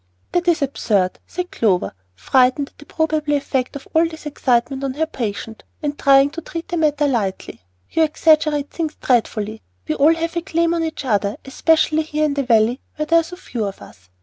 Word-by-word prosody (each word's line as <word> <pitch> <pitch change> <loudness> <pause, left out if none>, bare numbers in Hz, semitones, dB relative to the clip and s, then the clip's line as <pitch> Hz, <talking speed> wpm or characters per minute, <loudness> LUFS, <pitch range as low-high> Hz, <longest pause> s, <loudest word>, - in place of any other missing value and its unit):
"That 355 0 0
is 335 -4 +3
absurd," 205 -9 0
said 360 +1 -5
Clover, 195 -6 +1 0.2
frightened 255 - +2
at - - -37
the 295 - -14
probable 310 -2 0
effect 270 -3 -1
of 280 - -8
all 325 +1 +4
this 320 -1 -11
excitement 265 -2 0
on 265 -1 -2
her 320 +2 +1
patient, 225 -5 -5 0.2
and 295 -1 -1
trying 275 0 +5
to 335 - -6
treat 330 +1 -7
the 345 - -2
matter 295 -2 +2
lightly. 210 - -2 0.3
"You 325 - +1
exaggerate 305 -2 +2
things 315 -2 -3
dreadfully. 220 -3 0 0.3
We - - 0
all 305 - +4
have 330 +1 -3
a 340 - 0
claim 335 -1 0
on 335 -1 0
each 320 -3 -4
other, 205 -3 0
especially 315 +3 +2
here 305 0 -1
in 295 - 0
the 280 - 0
Valley 235 0 +2
where 305 - -2
there 335 +2 +5
are - - 0
so 345 +2 -9
few 245 -11 -5
of 200 -1 -6
us. 90 -2 -16
290 Hz, 200 wpm, -20 LUFS, 245-320 Hz, 0.3 s, trying